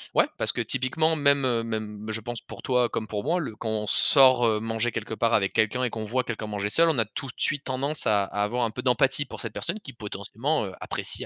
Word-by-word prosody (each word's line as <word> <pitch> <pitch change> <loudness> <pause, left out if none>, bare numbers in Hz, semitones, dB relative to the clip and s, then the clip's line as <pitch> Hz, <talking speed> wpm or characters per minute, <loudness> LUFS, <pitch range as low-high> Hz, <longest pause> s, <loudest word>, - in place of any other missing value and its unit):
ouais - - +5
parce - - +1
que - - -1
typiquement 155 +5 0
même, 140 -1 +3
heu, 115 -2 +1
même 110 -2 -5
je 110 +1 -3
pense 120 +1 -6
pour - - -11
toi 125 -2 +2
comme 110 - -4
pour 105 +1 -4
moi, 175 +4 +1
le 115 -9 -5
quand 115 - -3
on 105 -1 -2
sort, 130 +1 +6
heu, 110 -1 +1
manger 115 +1 -1
quelque 110 0 -4
part 115 +1 +1
avec 100 -2 +2
quelqu'un 110 +4 +1
et 125 - +1
qu'on 110 -1 -5
voit 125 +4 0
quelqu'un 110 -2 -5
manger 105 -1 -3
seul. 165 +9 +4
On 155 - +1
a 115 - +3
tout 135 +6 -7
de 120 - -9
suite 145 0 0
tendance 140 +4 -2
à 105 -2 +3
à 105 +1 -2
avoir 120 +4 -1
un 110 - -3
peu 125 - -5
d'empathie 135 +3 +2
pour - - -10
cette 115 -3 -6
personne 215 - -4
qui 135 - -10
potentiellement, 110 +6 -3
heu, 95 - -7
apprécie - - -4
115 Hz, 260 wpm, -26 LUFS, 110-135 Hz, -, sort